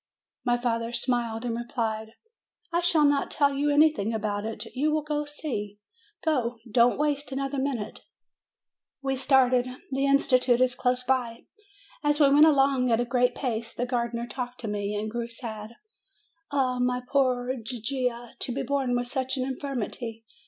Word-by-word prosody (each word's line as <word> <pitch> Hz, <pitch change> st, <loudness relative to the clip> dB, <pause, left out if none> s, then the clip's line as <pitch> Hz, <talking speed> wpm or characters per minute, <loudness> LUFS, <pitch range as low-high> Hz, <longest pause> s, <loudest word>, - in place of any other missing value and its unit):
My 245 Hz, -1 st, +2 dB
father 230 Hz, -1 st, -1 dB
smiled, 240 Hz, -1 st, -1 dB
and 235 Hz, -1 st, -1 dB
replied: 225 Hz, -2 st, -3 dB, 0.6 s
"I 345 Hz, -, +2 dB
shall 335 Hz, -3 st, +4 dB
not 285 Hz, -1 st, +2 dB
tell 285 Hz, -1 st, +2 dB
you 285 Hz, +2 st, +1 dB
anything 290 Hz, -7 st, +3 dB
about 205 Hz, -1 st, -2 dB
it; 225 Hz, -, -5 dB
you 295 Hz, +4 st, +1 dB
will 300 Hz, -1 st, -1 dB
see; 230 Hz, -9 st, -4 dB, 0.5 s
go, 255 Hz, -7 st, +1 dB
go; 230 Hz, -, -14 dB
don't 240 Hz, +2 st, +4 dB
waste 290 Hz, -1 st, -1 dB
another 275 Hz, +1 st, -2 dB
minute 255 Hz, -6 st, -3 dB, 0.6 s
!" -, -, -66 dB
We 270 Hz, 0 st, 0 dB
started. 255 Hz, -2 st, +3 dB, 0.2 s
The 270 Hz, +1 st, +1 dB
institute 255 Hz, -3 st, +4 dB
is 255 Hz, 0 st, +3 dB
close 250 Hz, 0 st, 0 dB
by. 245 Hz, -3 st, -1 dB, 0.6 s
As 295 Hz, 0 st, +2 dB
we 280 Hz, -2 st, +6 dB
went 295 Hz, +2 st, +7 dB
along 270 Hz, -3 st, +3 dB
at 225 Hz, -, +3 dB
a 245 Hz, -, +1 dB
great 245 Hz, 0 st, +2 dB
pace, 230 Hz, -3 st, -3 dB
the 245 Hz, -, -1 dB
gardener 235 Hz, -1 st, -2 dB
talked 245 Hz, 0 st, -6 dB
to 225 Hz, -, -4 dB
me, 205 Hz, 0 st, -2 dB
and 210 Hz, +1 st, -2 dB
grew 235 Hz, 0 st, -3 dB
sad. 230 Hz, -2 st, -7 dB, 0.7 s
"Ah, 255 Hz, -3 st, 0 dB
my 250 Hz, 0 st, 0 dB
poor 255 Hz, -2 st, +1 dB
Gigia! 240 Hz, 0 st, -3 dB
To -, -, -3 dB
be 270 Hz, +3 st, -2 dB
born 265 Hz, -2 st, 0 dB
with 245 Hz, 0 st, 0 dB
such 260 Hz, +1 st, -2 dB
an 255 Hz, -, 0 dB
in 265 Hz, -, -2 dB
firmity 240 Hz, -4 st, -5 dB
250 Hz, 170 wpm, -27 LUFS, 235-275 Hz, 0.7 s, went